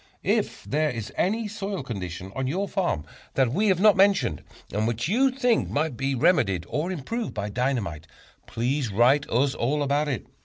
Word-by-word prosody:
If -, -, 0 dB
there 155 Hz, +2 st, 0 dB
is 115 Hz, -5 st, -5 dB
any 220 Hz, +4 st, 0 dB
soil 200 Hz, -5 st, -4 dB
condition 95 Hz, -5 st, -6 dB
on 130 Hz, -1 st, -1 dB
your 190 Hz, +9 st, -1 dB
farm 175 Hz, -, -1 dB, 0.3 s
that 130 Hz, -3 st, +2 dB
we 210 Hz, +7 st, +2 dB
have 190 Hz, -3 st, +3 dB
not 210 Hz, +1 st, +6 dB
mentioned, 195 Hz, -, +3 dB, 0.3 s
and 105 Hz, +2 st, 0 dB
which 120 Hz, +3 st, -1 dB
you 255 Hz, +9 st, +3 dB
think 250 Hz, -3 st, +1 dB
might 150 Hz, -2 st, -1 dB
be 135 Hz, +2 st, -1 dB
remedied 120 Hz, -, +2 dB
or 160 Hz, +5 st, -1 dB
improved 215 Hz, -, -4 dB
by 105 Hz, -1 st, -3 dB
dynamite, 110 Hz, -, -2 dB, 0.4 s
please 125 Hz, +1 st, -1 dB
write 125 Hz, +8 st, +3 dB
us 130 Hz, +4 st, +2 dB
all 145 Hz, +5 st, 0 dB
about 145 Hz, +2 st, +1 dB
it. 135 Hz, -6 st, -3 dB
140 Hz, 180 wpm, -25 LUFS, 115-190 Hz, 0.4 s, not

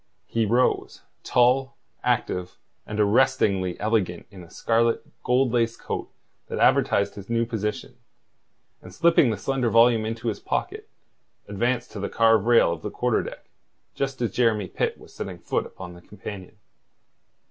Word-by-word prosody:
He 115 Hz, -2 st, 0 dB
rose, 120 Hz, +4 st, +1 dB, 0.2 s
tall, 130 Hz, +2 st, +2 dB, 0.3 s
active, 90 Hz, 0 st, -1 dB, 0.3 s
and 105 Hz, 0 st, -4 dB
arrestingly 105 Hz, -5 st, +2 dB
elegant 105 Hz, -5 st, -1 dB
in 95 Hz, -3 st, -11 dB
a 85 Hz, -, -15 dB
scarlet, 115 Hz, +3 st, +1 dB, 0.2 s
gold 125 Hz, 0 st, +2 dB
laced 115 Hz, -1 st, 0 dB
coat -, -, -5 dB, 0.4 s
that -, -, -4 dB
advertised 100 Hz, 0 st, +3 dB
his 100 Hz, +1 st, -11 dB
new 115 Hz, 0 st, +1 dB
position, 105 Hz, -2 st, -4 dB, 0.9 s
and -, -, -12 dB
slipping 165 Hz, -6 st, +4 dB
the 110 Hz, -, -1 dB
slender 130 Hz, +2 st, -1 dB
volume 115 Hz, 0 st, +5 dB
into 115 Hz, +1 st, -3 dB
his 105 Hz, -, -4 dB
pocket, -, -, -3 dB, 0.6 s
advanced 120 Hz, +4 st, -1 dB
to 105 Hz, -, -7 dB
the 100 Hz, -, -3 dB
carved 115 Hz, -2 st, +3 dB
rail 115 Hz, -8 st, +5 dB
of 85 Hz, -, -8 dB
the -, -, -4 dB
quarter -, -, 0 dB
deck, -, -, -9 dB, 0.5 s
just 135 Hz, -1 st, -3 dB
as 115 Hz, -, -1 dB
Jeremy 110 Hz, -5 st, +1 dB
Pitt -, -, -2 dB
was -, -, -16 dB
setting -, -, -6 dB
foot -, -, -2 dB
upon 90 Hz, -2 st, -10 dB
the 85 Hz, -, -14 dB
companion. 100 Hz, -1 st, -10 dB
115 Hz, 155 wpm, -25 LUFS, 100-120 Hz, 0.9 s, volume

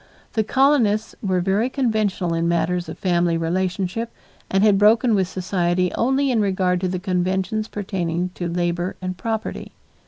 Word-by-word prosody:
The 220 Hz, -, +1 dB
colonists 230 Hz, -4 st, +2 dB
were 185 Hz, -3 st, 0 dB
very 200 Hz, +7 st, +1 dB
conventional 215 Hz, -9 st, 0 dB
in 165 Hz, 0 st, 0 dB
matters 170 Hz, +1 st, 0 dB
of -, -, -7 dB
family 175 Hz, -2 st, +1 dB
relationship 185 Hz, +6 st, -2 dB, 0.4 s
and 195 Hz, +1 st, +2 dB
had 205 Hz, -2 st, +5 dB
broken 220 Hz, +3 st, +4 dB
with 190 Hz, -3 st, +2 dB
society 180 Hz, -1 st, 0 dB
only 270 Hz, +3 st, +1 dB
in 230 Hz, -3 st, +2 dB
regard 185 Hz, -3 st, +1 dB
to 185 Hz, -, 0 dB
the 185 Hz, 0 st, -2 dB
conventions 190 Hz, +3 st, -1 dB
pertaining 180 Hz, -4 st, -3 dB
to 175 Hz, -, -4 dB
labor 175 Hz, +1 st, -1 dB
and 185 Hz, 0 st, -4 dB
property. 220 Hz, +3 st, -4 dB
190 Hz, 155 wpm, -22 LUFS, 180-215 Hz, 0.4 s, had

